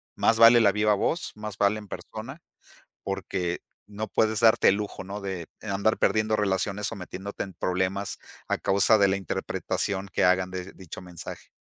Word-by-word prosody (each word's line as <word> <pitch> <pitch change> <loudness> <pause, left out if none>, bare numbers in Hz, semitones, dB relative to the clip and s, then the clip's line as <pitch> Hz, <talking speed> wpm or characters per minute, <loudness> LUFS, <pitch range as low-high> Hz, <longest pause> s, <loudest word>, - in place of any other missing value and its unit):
más 115 0 +2
vale 115 +1 +8
la 100 -2 +5
viva 105 0 +2
voz, 165 - -1
más 105 -1 -7
vale 100 +1 +3
en 105 -1 -9
persona, 110 - -8 0.6
porque 90 -1 -2 0.3
no 105 +1 -5
puedes 110 +1 +1
darte 115 +1 +6
el - - +4
lujo, 105 0 -5
¿no?, 100 +2 -6
de 95 -4 -4 0.2
andar 100 +1 0
perdiendo 110 0 +2
relaciones 100 0 0
sometiéndote 100 -1 -6
en 95 - -9
problemas 95 +3 -1 0.3
a - - 0
causa 100 +3 +4
de 100 -1 +5
la 95 - +1
interpretación 100 +1 -3
que - - +1
hagan 90 0 +3
de 95 +1 -6
dicho 95 -2 -9
mensaje. 90 -2 -9
100 Hz, 170 wpm, -26 LUFS, 95-110 Hz, 0.6 s, vale